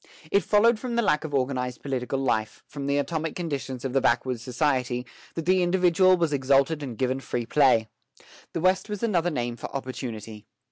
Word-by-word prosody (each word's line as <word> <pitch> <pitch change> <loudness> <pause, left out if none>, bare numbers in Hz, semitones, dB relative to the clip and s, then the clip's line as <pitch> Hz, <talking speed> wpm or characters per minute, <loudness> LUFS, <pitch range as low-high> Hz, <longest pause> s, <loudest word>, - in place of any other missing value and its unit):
It 200 - +4
followed 220 +2 +4
from 245 -1 -4
the 235 - +2
lack 150 -7 +2
of 160 - -5
organized 130 -2 -2
political 135 -1 -2
life, 115 -5 -1
from 140 -1 -6
the 140 0 +1
atomic 160 +2 -2
conditions 140 -7 -4
of 130 - -2
the 135 - +3
backwoods 125 -2 +1
society, 125 -1 0 0.3
that 165 - -4
the 185 +1 +3
individual 180 +1 +4
was 165 -3 0
exalted 140 +3 +2
and 125 -6 -6
given 130 0 0
free 120 -3 -3
play. 125 -4 +3 0.7
The 165 - -2
West 185 +4 +2
was 210 0 -4
another 175 -6 +2
name 120 -6 -3
for - - -6
opportunity. 115 -5 -6
140 Hz, 185 wpm, -26 LUFS, 125-170 Hz, 0.7 s, It